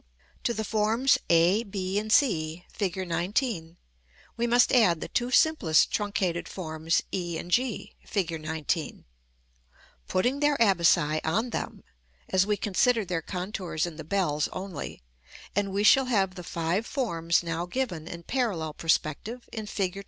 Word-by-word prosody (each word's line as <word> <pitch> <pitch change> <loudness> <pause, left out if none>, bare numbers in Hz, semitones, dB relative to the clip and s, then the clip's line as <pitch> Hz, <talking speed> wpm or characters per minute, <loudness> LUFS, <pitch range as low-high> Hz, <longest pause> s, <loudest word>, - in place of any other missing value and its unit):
To 235 - +2
the 220 - -2
forms 220 +5 +2
a, 170 +5 +4
b, 195 -2 -2
and 215 +1 -5
c, 175 - +2
Fig. 190 -4 -2 0.2
XIX., 175 - -1 0.6
we 235 +1 0
must 240 +1 +4
add 185 -10 +4
the - - -5
two 240 +1 -1
simplest 280 - +4
truncated 190 -4 -1
forms 160 -2 -1
e 175 -3 -2
and 175 - -7
g, 245 +2 0
Fig. 195 -6 -1
XIX., 160 0 -3 1.0
putting 245 +9 +1
their 295 -1 +2
abaci 170 -7 +3
on 220 +10 0
them - - -5 0.5
(as 190 +1 +3
we 210 -1 +1
considered 210 +1 +1
their 170 -2 -1
contours 180 -2 -3
in 170 -3 -7
the 155 - -6
bells 150 -3 0
only), 185 - -6 0.5
and 200 0 0
we 200 +2 0
shall 265 +5 +6
have 195 -7 +1
the 180 - -8
five 170 +6 -2
forms 170 - 0
now 170 +1 -3
given 180 -8 -3
in 170 -1 -8
parallel 185 - -1
perspective 165 +10 -1
in 220 -2 -5
Fig. 195 -2 -2
190 Hz, 150 wpm, -27 LUFS, 165-220 Hz, 1.0 s, shall